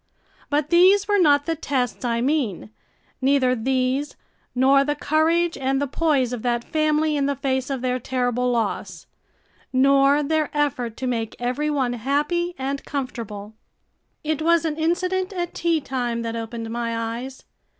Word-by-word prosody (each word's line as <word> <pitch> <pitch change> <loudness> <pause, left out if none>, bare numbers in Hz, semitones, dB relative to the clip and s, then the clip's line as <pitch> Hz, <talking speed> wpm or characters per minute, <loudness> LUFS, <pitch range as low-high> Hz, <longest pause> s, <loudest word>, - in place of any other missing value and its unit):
But 295 +2 0
these 375 +4 +5
were 410 -1 +3
not 290 -4 +4
the 330 - -1
tests 260 -7 -2
I 235 -1 0
mean, 245 - -1 0.5
neither 265 -1 +3
these 260 +3 -1 0.4
nor 270 +2 +5
the 295 +1 -1
courage 325 +3 +1
and 270 0 0
the 285 - 0
poise 275 -3 +1
of 240 - -4
that 240 0 0
family 310 +1 +1
in 280 -1 +1
the 280 - 0
face 265 -1 -1
of 270 -3 -3
their 255 0 0
terrible 250 0 -1
loss, 230 -4 -2 0.7
nor 275 +2 +4
their 310 +1 0
effort 250 -6 -1
to 260 - -4
make 230 -3 -2
every 255 +5 -1
one 265 -5 0
happy 295 +8 -1
and 275 +1 -3
comfortable. 225 -7 -5 0.7
It 310 0 -1
was 335 +1 +3
an 310 -2 -1
incident 370 +4 0
at 350 -2 -3
tea 335 -1 +1
time 245 -4 -3
that 230 0 -3
opened 225 0 -5
my 230 -1 -2 0.2
eyes. 260 +1 -9
275 Hz, 160 wpm, -23 LUFS, 245-310 Hz, 0.7 s, these